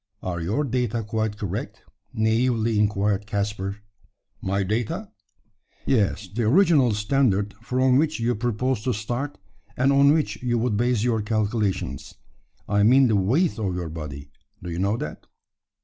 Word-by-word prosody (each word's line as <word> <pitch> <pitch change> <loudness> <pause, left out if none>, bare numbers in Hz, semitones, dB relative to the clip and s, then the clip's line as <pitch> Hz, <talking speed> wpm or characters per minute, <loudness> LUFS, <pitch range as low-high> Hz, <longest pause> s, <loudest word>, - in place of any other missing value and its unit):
"Are 85 -2 -3
your 105 - 0
data 120 -4 -1
quite 110 0 -2
correct?" 100 -4 -5 0.3
naively 110 0 +1
inquired 105 -1 +1
Caspar. 100 0 -3 0.6
"My 95 +1 0
data!" 120 - -2 0.7
"Yes 105 -4 +1
the 105 +6 -4
original 145 - +4
standard 105 -2 +1
from 130 +2 +2
which 155 -1 +1
you 120 +1 +1
propose 120 +2 -1
to 125 - +1
start, 120 +7 -4 0.4
and 135 +2 +3
on 140 +1 +6
which 155 0 0
you 120 -1 0
would 115 -2 0
base 120 0 +1
your 115 -3 +1
calculations. 105 - -2 0.5
I 100 0 +2
mean 125 +4 +5
the 110 - +3
weight 125 - +1
of 95 -4 -1
your 85 -2 -4
body. 75 -3 -8 0.3
Do 90 - -5
you 85 - -4
know 100 +4 +1
that?" 75 - -7
110 Hz, 150 wpm, -24 LUFS, 100-125 Hz, 0.7 s, on